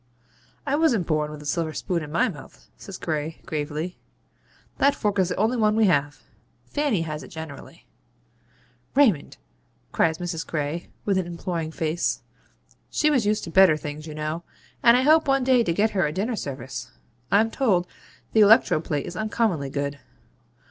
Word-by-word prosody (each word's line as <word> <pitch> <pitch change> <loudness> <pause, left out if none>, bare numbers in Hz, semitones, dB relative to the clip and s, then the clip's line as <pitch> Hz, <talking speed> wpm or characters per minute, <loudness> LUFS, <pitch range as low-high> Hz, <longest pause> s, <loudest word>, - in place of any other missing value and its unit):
'I 285 0 +1
wasn't 250 - +2
born 155 -2 0
with 150 -1 -9
a - - -13
silver 160 +2 -1
spoon 175 0 -2
in 150 -1 -7
my 170 - +2
mouth,' 145 -9 -11
says 195 -2 -9
Gray, 155 0 -3
gravely. 155 +3 -4 0.8
'That 280 +1 +4
fork 205 -2 -1
is 185 -1 +2
the 180 - -2
only 220 +5 +1
one 215 -1 +3
we 220 -1 +4
have. 145 -5 +1 0.4
Fanny 285 - 0
has 155 -2 -5
it - - -10
generally.' 160 -3 -10 1.1
'Raymond!' 225 - +3 0.5
cries 160 -1 +2
Mrs. 170 -2 -4
Gray, 155 +2 -3 0.2
with 195 -2 +2
an 180 - -3
imploring 170 -1 -4
face. 160 +1 -1 0.7
'She 305 -1 +2
was 250 -8 +2
used 210 0 +1
to 165 - -6
better 185 -4 +6
things, 150 +1 -7
you 155 - -7
know: 155 +2 -3 0.4
and 235 +1 +7
I 255 - +2
hope 310 +2 +5
one 270 -1 +3
day 250 -2 +4
to 170 - 0
get 210 +6 +2
her 190 -6 +1
a - - -3
dinner 205 +9 -2
service. 130 - -6 0.4
I'm 220 +3 +4
told 200 -11 +2 0.5
the 220 - +5
electro 210 -6 +6
plate 150 -3 -2
is 175 - -7
uncommonly 215 -9 0
good. 140 +1 -3
175 Hz, 175 wpm, -24 LUFS, 155-215 Hz, 1.1 s, and